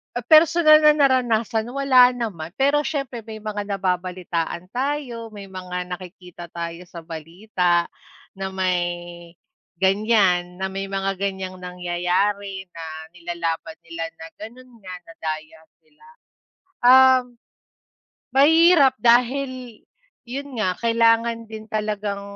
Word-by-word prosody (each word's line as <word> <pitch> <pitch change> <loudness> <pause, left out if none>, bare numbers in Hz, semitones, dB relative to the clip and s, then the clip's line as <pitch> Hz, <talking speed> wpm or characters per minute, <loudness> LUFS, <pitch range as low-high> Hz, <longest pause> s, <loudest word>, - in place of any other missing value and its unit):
Ah, 245 - -2
personal 310 +3 +6
na 300 -1 +5
naranasan 240 -5 +1
wala 260 -2 +5
naman, 195 -9 -5
pero 285 +4 +1
syempre 270 -6 -4
may 220 -1 -9
mga 210 -1 -4
nababalitaan 180 -3 -3
tayo, 250 -3 -4
may 200 -2 -10
mga 180 -1 -6
nakikita 180 -1 -9
tayo 170 +1 -6
sa 170 -1 -10
balita 175 +2 -1 0.5
na 190 0 -5
may 175 -2 -3 0.5
ganyan 190 -3 +2
na 190 - -1
may 195 +1 -4
mga 195 0 -3
ganyang 190 -1 -4
nangyayari 180 +2 -2
na 165 -2 -9 0.2
nilalaban 170 -1 -4
nila 165 0 -6 0.2
na - - -7
ganun 245 +4 -11
nga. 185 - -7 1.9
Um 260 +1 +7 1.1
mahirap 320 0 +6
dahil 250 0 +1 0.5
'yon 270 -1 -6
nga 185 -4 0
kailangan 230 0 +1
din 220 0 -8
talagang 210 -2 -2
200 Hz, 105 wpm, -22 LUFS, 180-245 Hz, 1.9 s, Um